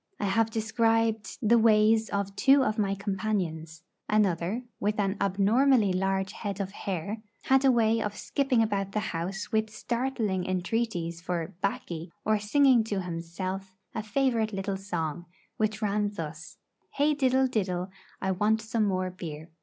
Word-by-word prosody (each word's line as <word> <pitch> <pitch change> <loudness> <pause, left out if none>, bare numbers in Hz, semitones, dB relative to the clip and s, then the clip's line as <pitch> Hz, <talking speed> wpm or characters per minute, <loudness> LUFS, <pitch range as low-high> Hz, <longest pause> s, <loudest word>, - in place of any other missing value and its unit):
I - - -1
have 225 +3 +2
described 225 -1 +1
the 235 +2 +6
ways 220 0 +4
of 200 -1 -2
two 275 +3 +5
of 215 -2 -1
my 195 -1 +1
companions. 190 -6 -3 0.3
Another, 205 +1 +1 0.2
with 210 +1 0
an 195 -1 +1
abnormally 205 +3 +3
large 190 +1 0
head 200 -2 -5
of 195 -1 -3
hair, 200 +2 -4 0.2
had 265 0 +4
a 270 - +6
way 225 -2 +3
of 210 -1 -3
skipping 265 -5 +1
about 195 -2 -2
the 215 - +1
house 185 +7 -4
with 220 -1 +1
startling 230 -4 -2
entreaties 180 -3 -2
for 175 +1 -3
'baccy,' 175 -4 -3
or 215 0 +2
singing 255 +3 +4
to 205 -3 -2
himself 185 +3 -5 0.2
a 220 - -2
favourite 225 -1 0
little 195 0 -2
song, 175 -4 -4 0.3
which 215 0 -1
ran 205 0 +1
thus: 165 -4 -7 0.4
'Hey 295 +2 +3
diddle 265 -2 +3
diddle, 185 -7 -1 0.3
I 190 - 0
want 210 +4 +2
some 220 0 0
more 185 -1 -1
beer.' 160 -3 -8
205 Hz, 155 wpm, -28 LUFS, 185-225 Hz, 0.4 s, the